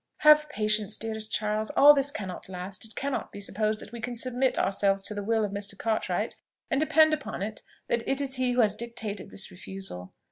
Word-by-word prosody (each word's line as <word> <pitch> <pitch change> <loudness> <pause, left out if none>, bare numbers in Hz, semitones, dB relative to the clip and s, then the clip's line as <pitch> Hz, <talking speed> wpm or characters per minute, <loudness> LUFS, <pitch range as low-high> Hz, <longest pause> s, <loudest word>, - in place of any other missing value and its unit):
"Have 300 0 +7
patience, 215 -4 0
dearest 220 -1 -4
Charles! 215 0 0
All 290 +1 +10
this 280 -1 +2
cannot 190 -9 -6
last. 185 +1 -6
It 220 - -8
cannot 275 0 -3
be - - -8
supposed 215 +2 -1
that - - -11
we 235 -1 -7
can 245 +1 -4
submit 255 +2 +1
ourselves 195 0 +1
to 210 - +1
the 205 - -3
will 220 +1 +1
of 200 - -5
Mr. 200 0 -5
Cartwright: 220 0 -1 0.3
and 270 - +2
depend 315 0 +5
upon 285 -9 -3
it 215 +1 -5 0.3
that 235 - +1
it 270 - +1
is 270 -2 -1
he 255 -1 +1
who 245 - +4
has 215 -2 +4
dictated 230 -3 -5
this 190 - -3
refusal. 180 - -8
220 Hz, 210 wpm, -28 LUFS, 200-255 Hz, 0.3 s, All